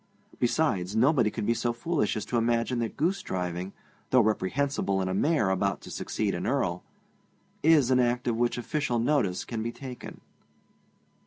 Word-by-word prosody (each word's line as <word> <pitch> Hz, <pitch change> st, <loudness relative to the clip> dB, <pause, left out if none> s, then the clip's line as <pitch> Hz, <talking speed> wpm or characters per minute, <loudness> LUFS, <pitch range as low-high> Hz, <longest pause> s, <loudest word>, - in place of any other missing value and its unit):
Besides, 110 Hz, -, +1 dB
nobody 125 Hz, -1 st, +4 dB
could 105 Hz, -, -4 dB
be 115 Hz, -, +3 dB
so 120 Hz, 0 st, -1 dB
foolish 130 Hz, -3 st, -1 dB
as 105 Hz, -, -4 dB
to 120 Hz, -, -1 dB
imagine 120 Hz, +1 st, +1 dB
that 115 Hz, -2 st, -3 dB
goosedriving, 95 Hz, -, -2 dB, 0.4 s
though 130 Hz, -, +5 dB
reprehensible 110 Hz, 0 st, 0 dB
in 95 Hz, -, -1 dB
a 95 Hz, -, -1 dB
Mayor 110 Hz, -, +2 dB
about 100 Hz, 0 st, 0 dB
to -, -, -10 dB
succeed -, -, -2 dB
an -, -, -3 dB
Earl, -, -, 0 dB, 0.8 s
is 150 Hz, -5 st, +5 dB
an 130 Hz, -, +4 dB
act 125 Hz, 0 st, +1 dB
of 120 Hz, -, +1 dB
which 120 Hz, +1 st, 0 dB
official 125 Hz, 0 st, -1 dB
notice 115 Hz, -7 st, +1 dB
can 115 Hz, -2 st, -4 dB
be 115 Hz, +1 st, -2 dB
taken. 130 Hz, 0 st, -9 dB
120 Hz, 165 wpm, -28 LUFS, 105-130 Hz, 0.8 s, though